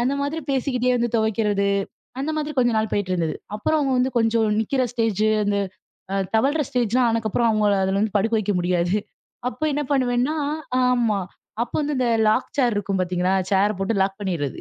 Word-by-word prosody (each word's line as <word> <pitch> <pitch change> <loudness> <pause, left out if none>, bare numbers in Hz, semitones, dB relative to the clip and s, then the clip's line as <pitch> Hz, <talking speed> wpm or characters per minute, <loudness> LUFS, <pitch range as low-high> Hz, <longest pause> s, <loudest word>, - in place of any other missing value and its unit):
அந்த 255 +3 +1
மாதிரி 295 +3 -2
பேசிக்கிட்டே 255 -2 +1
வந்து 240 -1 0
துவைக்கிறது. 210 -2 +1 0.5
அந்த 300 +3 -2
மாதிரி 305 0 -2
கொஞ்ச 240 -1 +4
நாள் 220 0 -1
போயிட்டு 205 -2 -1
இருந்தது. 165 -3 -1 0.2
அப்புறம் 305 +9 +1
அவங்க 270 -2 +1
வந்து 255 +1 +2
கொஞ்சம் 225 -1 +2
நிக்கிற 260 +4 0
ஸ்டேஜ், 225 -3 0 0.2
அந்த 205 0 +1 0.8
தவழ்ற 280 +7 +2
ஸ்டேஜ்லாம் 245 0 +2
ஆன 230 0 0
அப்புறம் 235 +2 +2
அவங்களை 210 -2 +2
அதுல 195 +1 0
வந்து 215 -1 -1
படுக்க 225 +3 +1
வைக்க 205 0 -1
முடியாது. 175 +2 +1 0.5
அப்போ 310 - -8
என்ன 295 - 0
பண்ணுவேன்னா 255 +2 +1 0.5
ஆமா 235 -5 +2 0.4
அப்ப 235 - -4
வந்து 295 0 -1
இந்த 250 - +1 0.2
லாக் 230 +4 +2
சேர் 245 -4 +3
இருக்கும் 200 -1 -1
பார்த்தீங்களா, 180 0 0 0.2
சேரை 200 +2 +3
போட்டு 195 +4 -1
லாக் 195 0 0
பண்ணிடுறது. 170 -9 -3
225 Hz, 175 wpm, -23 LUFS, 200-250 Hz, 0.8 s, கொஞ்ச